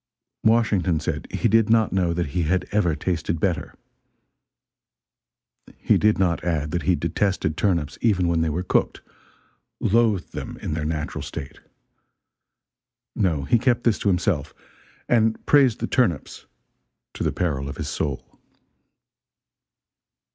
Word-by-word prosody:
Washington 105 Hz, -7 st, +2 dB
said -, -, -4 dB
he 120 Hz, -, 0 dB
did 110 Hz, 0 st, +3 dB
not 110 Hz, -3 st, +3 dB
know 90 Hz, -3 st, +1 dB
that 85 Hz, -2 st, -2 dB
he 90 Hz, -, 0 dB
had 90 Hz, +3 st, 0 dB
ever 95 Hz, -7 st, +1 dB
tasted 85 Hz, -2 st, -2 dB
better. 90 Hz, 0 st, -2 dB, 2.0 s
He -, -, +2 dB
did 105 Hz, 0 st, +3 dB
not 90 Hz, -3 st, +1 dB
add 80 Hz, -4 st, -1 dB
that 85 Hz, -, -1 dB
he 90 Hz, -, +2 dB
detested 85 Hz, -1 st, -1 dB
turnips 85 Hz, -6 st, -1 dB
even 95 Hz, -6 st, +2 dB
when 85 Hz, -1 st, +1 dB
they 80 Hz, -, +1 dB
were 85 Hz, +4 st, -2 dB
cooked 90 Hz, -, 0 dB, 0.8 s
loathed 110 Hz, -3 st, +1 dB
them -, -, -6 dB
in -, -, -4 dB
their 75 Hz, -1 st, -3 dB
natural 75 Hz, -1 st, -3 dB
state. -, -, -7 dB, 1.6 s
No, 80 Hz, -8 st, 0 dB
he 80 Hz, -, +2 dB
kept 120 Hz, -1 st, +1 dB
this 115 Hz, -4 st, +2 dB
to -, -, -2 dB
himself, 90 Hz, -6 st, 0 dB, 0.5 s
and 110 Hz, -2 st, +1 dB
praised 135 Hz, -6 st, +4 dB
the -, -, +1 dB
turnips 105 Hz, -, -1 dB, 0.7 s
to -, -, -4 dB
the -, -, +1 dB
peril 70 Hz, -6 st, -2 dB
of -, -, -7 dB
his -, -, -4 dB
soul. 70 Hz, -4 st, -4 dB
90 Hz, 140 wpm, -23 LUFS, 80-105 Hz, 2.0 s, praised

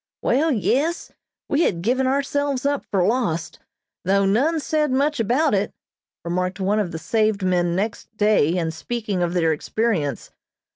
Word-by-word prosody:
"Wall, 300 Hz, +6 st, +2 dB
yes, 285 Hz, -, 0 dB, 0.4 s
we 285 Hz, -, +1 dB
had 170 Hz, -, 0 dB
given 255 Hz, +4 st, +1 dB
ourselves 280 Hz, 0 st, 0 dB
up 285 Hz, 0 st, -1 dB
for 185 Hz, -3 st, +2 dB
lost, 205 Hz, -8 st, -1 dB, 0.4 s
though 195 Hz, +2 st, +2 dB
none 275 Hz, +12 st, +2 dB
said 305 Hz, 0 st, 0 dB
much 280 Hz, +3 st, +1 dB
about 250 Hz, +7 st, +2 dB
it," 200 Hz, 0 st, 0 dB, 0.5 s
remarked 180 Hz, +2 st, -2 dB
one 200 Hz, +3 st, +1 dB
of 190 Hz, -5 st, -1 dB
the 160 Hz, -, -4 dB
saved 215 Hz, +3 st, 0 dB
men 175 Hz, -2 st, +1 dB
next 205 Hz, +3 st, -2 dB
day, 205 Hz, -6 st, +3 dB
in 165 Hz, -2 st, -1 dB
speaking 210 Hz, +2 st, -3 dB
of 175 Hz, 0 st, 0 dB
their 165 Hz, -2 st, +3 dB
experience. 155 Hz, -, -2 dB
215 Hz, 155 wpm, -22 LUFS, 180-270 Hz, 0.5 s, day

